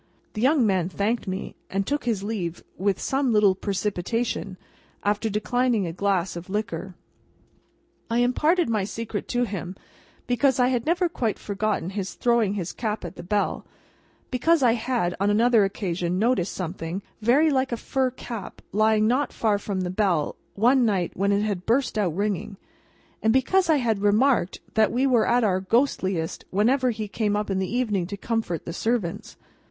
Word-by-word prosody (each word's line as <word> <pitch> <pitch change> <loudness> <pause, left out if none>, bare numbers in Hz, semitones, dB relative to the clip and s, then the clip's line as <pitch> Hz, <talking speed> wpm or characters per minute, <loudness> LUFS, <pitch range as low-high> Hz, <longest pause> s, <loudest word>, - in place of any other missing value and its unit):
The 215 - -4
young 270 0 +4
man 185 -4 +1
thanked 210 +4 -1
me, 190 +1 -4
and 195 0 -1
took 290 +3 -2
his 220 -5 0
leave 185 -6 -4
with 195 0 0
some 270 -2 0
little 210 -3 +5
precipitation, 200 +1 -2 0.5
after 210 +2 0
declining 225 +1 +1
a 165 - -4
glass 190 -2 0
of 175 +2 -8
liquor. 205 -2 -3 1.1
I 230 - 0
imparted 300 +8 +2
my 220 -3 0
secret 215 +1 -4
to 245 0 0
him, 190 -4 -4 0.5
because 260 +1 +2
I 250 0 +4
had 245 +1 -1
never 350 +2 +2
quite 235 - -2
forgotten 205 -3 -2
his 195 -2 -4
throwing 235 -4 +2
his 180 -4 -4
cap 215 -3 -3
at - - -7
the - - -8
bell; 205 +4 -1 0.7
because 300 +4 +3
I 240 - +6
had, 225 -6 0
on 200 +1 +2
another 225 +1 +4
occasion, 180 -3 -2
noticed 210 -4 +1
something 180 +1 -4 0.2
very 280 +8 +4
like 265 -1 +1
a 235 - -1
fur 265 +2 0
cap, 235 -5 -8
lying 215 +1 +3
not 260 +5 +1
far 210 -3 +1
from 200 -2 -3
the 180 -1 -2
bell, 185 -6 +1 0.2
one 245 +5 +4
night 195 -6 +1
when 200 +2 0
it 200 0 +2
had 200 -4 -3
burst 245 +2 +1
out 190 -7 0
ringing; 200 0 -2 0.6
and 220 - +3
because 335 +9 +2
I 320 - +6
had 225 -6 0
remarked 210 -1 +2
that 220 -1 +3
we 255 +3 +1
were 245 -5 +3
at 240 0 +3
our 190 -3 +2
ghostliest 190 -6 0
whenever 250 +7 +2
he 215 -2 -3
came 205 0 -1
up 210 -1 -2
in 190 - 0
the 190 - -2
evening 215 -8 0
to 200 +2 -6
comfort 220 -6 -2
the 170 - -5
servants. 205 -3 -2
215 Hz, 175 wpm, -25 LUFS, 195-245 Hz, 1.1 s, I